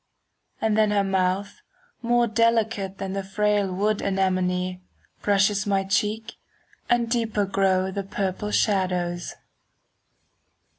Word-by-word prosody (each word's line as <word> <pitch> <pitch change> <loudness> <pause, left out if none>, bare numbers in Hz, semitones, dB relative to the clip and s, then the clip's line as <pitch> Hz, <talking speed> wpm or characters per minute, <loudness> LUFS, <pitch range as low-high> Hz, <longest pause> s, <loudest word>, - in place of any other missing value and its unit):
And 220 -1 +1
then 215 -1 +3
her 205 -1 +2
mouth, 195 - -1 0.4
more 240 0 +3
delicate 225 -3 +1
5 - - -30
Than 190 0 -4
the 195 - -2
frail 205 0 0
wood 205 +3 0
anemone, 185 -1 0 0.4
Brushes 205 +1 +2
my 195 -1 +2
cheek, 210 +3 -1 0.5
and 240 -1 +2
deeper 225 -3 0
grow 190 -1 +1
The 200 - -3
purple 195 +1 -3
shadows. 180 -4 0
200 Hz, 115 wpm, -24 LUFS, 190-215 Hz, 0.5 s, then